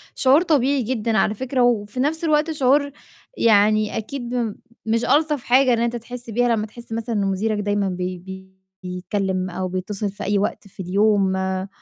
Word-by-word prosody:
شعور 275 +5 +4
طبيعي 280 -5 +2
جدًا 225 -2 -1
على 215 - +2
فكرة، 260 +3 -2
وفي 235 -1 +1
نَفْس 315 +5 0
الوقت 310 0 +2
شعور 285 0 +2 0.5
يعني 215 -1 +3
أكيد 240 -1 -3 0.3
مش 230 +1 0
ألطف 295 0 +2
حاجة 255 +1 +4
إن 230 - +1
أنت 235 0 0
تحس 240 +1 -7
بيها، 235 +1 +2
لمّا 210 - -2
تحس 235 +2 -13
مثلًا 230 +1 -3
إن 200 -1 +1
مديرك 205 +3 0
دايمًا 205 -1 0
بي 180 0 -3 0.7
بيتكلِّم 185 +1 -2
أو 185 +1 -3
بيتّصل 190 +3 -3
في 205 +1 -8
أي 205 0 +1
وقت 200 0 -2
في 195 - -21
اليوم 195 +1 +2
آآ 190 0 -2
220 Hz, 175 wpm, -22 LUFS, 200-250 Hz, 0.7 s, شعور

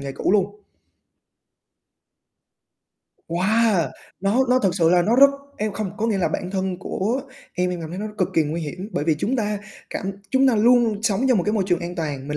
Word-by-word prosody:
nghề 140 -1 -5
cũ 185 - 0
luôn? 205 +1 +1 2.7
Wow! 190 - +2 0.3
Nó 210 +7 +2
nó 255 - +5
thực 190 -6 +1
sự 165 -3 +3
là 180 -1 +4
nó 225 +7 +2
rất 275 +1 +8 0.3
em 215 0 -2
không 195 -1 -3
có 225 0 -1
nghĩa 210 -4 0
là 185 - +1
bản 180 - -4
thân 190 -1 -2
của 225 +8 -2 0.3
em, 180 0 0
em 180 - -4
cảm 160 -1 -6
thấy 180 - -6
nó 215 - -3
cực 185 - +1
kỳ 160 - +4
nguy 155 +3 -3
hiểm, 180 +7 -6
bởi - - -1
vì 160 -1 +3
chúng 250 +11 0
ta 210 -3 -1 0.3
cảm 195 +1 -3 0.2
chúng 265 0 +4
ta 245 - +3
luôn 230 -2 +3
sống 225 +3 +1
trong 245 -6 +4
một - - 0
cái 210 - 0
môi 205 -3 +1
trường 175 -2 +1
an 175 0 -5
toàn, 145 -5 -4
mình 150 - -2
195 Hz, 220 wpm, -22 LUFS, 175-220 Hz, 2.7 s, rất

